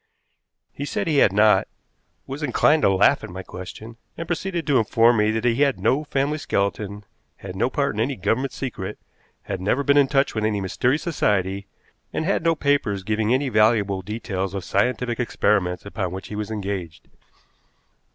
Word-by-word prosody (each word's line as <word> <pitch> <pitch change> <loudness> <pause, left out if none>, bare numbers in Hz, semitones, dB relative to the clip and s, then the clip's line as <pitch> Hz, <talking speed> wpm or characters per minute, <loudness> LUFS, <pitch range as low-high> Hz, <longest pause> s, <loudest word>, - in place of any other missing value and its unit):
He 140 - -6
said 200 +7 -2
he 155 -3 +1
had 100 - +5
not, 105 +2 +4 0.6
was 135 +3 -6
inclined 150 +2 +3
to - - +4
laugh 95 +1 +3
at - - -7
my 95 +2 -7
question, 105 +6 -9 0.2
and 165 - -4
proceeded 175 0 -2
to 140 -4 +3
inform 115 +2 +4
me 105 0 +3
that 110 +2 -1
he 120 +3 +2
had 140 -2 +2
no 140 +4 +1
family 145 +2 -1
skeleton, 100 -3 -2 0.3
had 95 -1 -9
no 120 +6 +1
part 140 +1 0
in 105 - -2
any 135 +4 0
Government 115 +7 -1
secret, 105 -7 -5 0.5
had 95 -2 -5
never 115 +9 +1
been 140 +1 +3
in 140 -1 +5
touch 135 0 +1
with 110 - -2
any 110 -1 0
mysterious 125 +9 0
society, 100 - 0 0.4
and 160 - -2
had 195 - +1
no 165 0 +3
papers 140 -10 0
giving 110 +2 0
any 135 +2 +2
valuable 105 -4 +2
details 100 -1 -4
of 95 - -4
scientific 120 +4 0
experiments 100 -6 0
upon 100 -3 -3
which 95 0 -7
he 105 - -6
was 105 0 -4
engaged. 95 -7 -5
110 Hz, 180 wpm, -23 LUFS, 100-135 Hz, 0.6 s, had